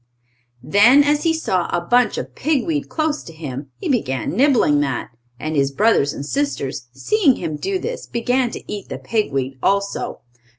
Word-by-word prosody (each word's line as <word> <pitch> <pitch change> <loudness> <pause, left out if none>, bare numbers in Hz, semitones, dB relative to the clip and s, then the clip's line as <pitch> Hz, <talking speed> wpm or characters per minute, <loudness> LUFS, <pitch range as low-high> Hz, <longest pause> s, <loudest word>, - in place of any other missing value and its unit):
Then, 235 - +6
as 295 +1 +2
he 330 - +4
saw 185 - 0
a 175 - +1
bunch 240 +8 +2
of - - -5
pig 290 -3 0
weed 300 -3 -2
close 310 -1 -1
to - - -11
him, 140 -4 -7
he - - -5
began 135 - 0
nibbling 245 - +4
that. 135 -4 -2 0.3
And 155 +2 -3
his 140 -1 +2
brothers 200 -4 +3
and 140 - -6
sisters, 145 - -2
seeing 290 - +2
him 160 -3 -4
do 385 - -2
this, 480 +6 -5
began 245 +1 0
to - - -8
eat 205 -2 -6
the - - -4
pig 215 -8 -1
weed 135 -1 -3
also. 200 0 -1
210 Hz, 180 wpm, -20 LUFS, -, 0.3 s, Then